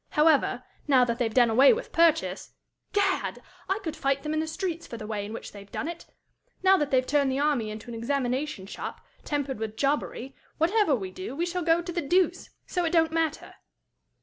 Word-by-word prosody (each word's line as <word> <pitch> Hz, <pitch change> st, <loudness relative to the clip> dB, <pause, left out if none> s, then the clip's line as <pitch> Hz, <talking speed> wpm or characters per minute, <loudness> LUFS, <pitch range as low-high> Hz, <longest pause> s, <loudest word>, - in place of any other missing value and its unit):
However, 300 Hz, -1 st, +3 dB, 0.2 s
now 260 Hz, -3 st, +5 dB
that 235 Hz, 0 st, -2 dB
they've 230 Hz, -3 st, +1 dB
done 240 Hz, 0 st, +4 dB
away 265 Hz, +5 st, +7 dB
with -, -, -5 dB
purchase 300 Hz, -, +2 dB, 0.4 s
Gad! 400 Hz, -2 st, 0 dB, 0.3 s
I 385 Hz, -, +2 dB
could 320 Hz, -, -4 dB
fight 275 Hz, 0 st, 0 dB
them 300 Hz, 0 st, -2 dB
in 310 Hz, -, 0 dB
the 315 Hz, -, -1 dB
streets 335 Hz, 0 st, -4 dB
for 235 Hz, -, -7 dB
the 215 Hz, -, -7 dB
way 210 Hz, -1 st, -3 dB
in 205 Hz, -, -7 dB
which 225 Hz, -, -7 dB
they've 200 Hz, -1 st, -12 dB
done -, -, -3 dB
it! 340 Hz, 0 st, -7 dB, 0.6 s
now 380 Hz, 0 st, +7 dB
that 295 Hz, -5 st, 0 dB
they've 255 Hz, -1 st, +2 dB
turned 280 Hz, -1 st, +2 dB
the 260 Hz, -, -1 dB
army 280 Hz, -6 st, +1 dB
into 215 Hz, +2 st, -8 dB
an 240 Hz, -, -7 dB
examination 250 Hz, -1 st, -2 dB
shop, 195 Hz, -, -7 dB, 0.2 s
tempered 285 Hz, -5 st, -2 dB
with 220 Hz, 0 st, -4 dB
jobbery, 275 Hz, -2 st, -1 dB, 0.2 s
whatever 345 Hz, -1 st, +3 dB
we 190 Hz, -5 st, -5 dB
do, 185 Hz, +8 st, -7 dB
we 335 Hz, +4 st, 0 dB
shall 355 Hz, +1 st, -2 dB
go 335 Hz, +1 st, +2 dB
to 350 Hz, -, -5 dB
the 345 Hz, -, -1 dB
deuce. 355 Hz, +6 st, +1 dB, 0.2 s
So 360 Hz, -, -1 dB
it 335 Hz, -, +1 dB
don't 325 Hz, -2 st, +4 dB
matter." 320 Hz, -1 st, -1 dB
285 Hz, 210 wpm, -27 LUFS, 235-330 Hz, 0.6 s, away